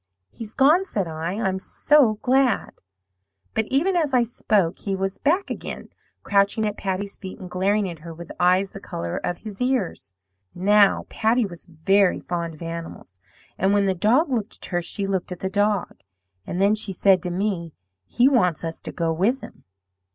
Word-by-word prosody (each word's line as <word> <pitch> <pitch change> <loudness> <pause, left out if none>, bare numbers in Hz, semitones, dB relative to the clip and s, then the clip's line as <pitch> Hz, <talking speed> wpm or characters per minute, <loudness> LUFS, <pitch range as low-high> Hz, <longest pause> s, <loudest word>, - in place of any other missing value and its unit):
"'He's 225 -1 -8
gone,' 305 +7 +5
said 200 - -2
I; 160 +2 -4
'I'm 190 -3 -1
so 265 +2 +3
glad.' 260 -1 +1 0.7
"But 220 - 0
even 340 +8 +1
as 305 -6 +1
I 245 - +5
spoke 210 -6 0
he 195 -1 -2
was 195 0 -3
back 345 +8 +1
again, - - -6 0.3
crouching 200 +2 +2
at 210 -1 -2
Patty's 195 0 -3
feet, 190 -2 -8
and 185 - -8
glaring 195 +3 +1
at 170 -3 -7
her 165 +2 -9
with 165 +1 -10
eyes 185 +2 +3
the 195 - -9
colour 85 - -5
of 175 - -3
his 210 +1 -9
ears. 205 - -1 0.4
"Now, 200 +2 +4
Patty 225 +2 +1
was 175 -4 -10
very 185 +4 +2
fond 170 -2 -4
of 155 - -10
animals, 165 - -8 0.4
and 195 +2 +3
when 200 -1 +3
the 190 - +2
dog 240 - +2
looked 225 -4 -2
at - - -7
her 175 -1 +1
she 195 +4 0
looked 190 -2 -2
at 180 - -7
the 190 - -2
dog, 205 -1 0 0.5
and 180 - -3
then 200 +2 +4
she 210 -2 0
said 185 0 +4
to 180 - -3
me, 175 -3 -2 0.3
'He 245 +2 +3
wants 180 - +2
us 165 0 -5
to - - -6
go 165 -2 -1
with 215 +11 +1
him.' - - -12
195 Hz, 190 wpm, -23 LUFS, 175-220 Hz, 0.7 s, gone